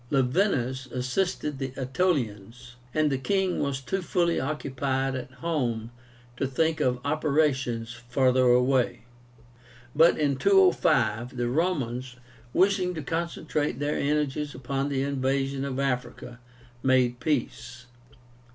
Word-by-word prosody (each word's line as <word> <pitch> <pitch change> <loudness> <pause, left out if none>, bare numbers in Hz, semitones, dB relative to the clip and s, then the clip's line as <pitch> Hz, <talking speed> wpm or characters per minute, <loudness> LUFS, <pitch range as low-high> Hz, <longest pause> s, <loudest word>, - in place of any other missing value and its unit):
Laevinus 130 - +1
assisted 140 +3 -2
the 135 -1 -4
Aetolians, 125 - -2 0.2
and 155 0 +1
the 135 - 0
king 190 +4 0
was 140 -1 -1
too 190 +9 -2
fully 170 -1 +1
occupied 135 -2 -2
at 130 0 -5 0.2
home 120 -8 -1 0.5
to 135 - 0
think 160 +4 0
of 125 -4 +1
operations 140 -6 0
farther 125 +1 +1
away. 125 -1 +2 0.9
But 165 +3 +5
in 145 -3 +1
205, 125 - +3
the 120 0 0
Romans, 130 -5 -1 0.4
wishing 185 0 +2
to 155 - -5
concentrate 160 -4 -2
their 145 +1 -1
energies 150 0 -1
upon 135 +2 -2
the 135 -1 0
invasion 135 0 -1
of 135 -2 -3
Africa, 125 -2 -3 0.4
made 125 -2 +2
peace. 125 -3 -3
135 Hz, 115 wpm, -27 LUFS, 125-150 Hz, 0.9 s, But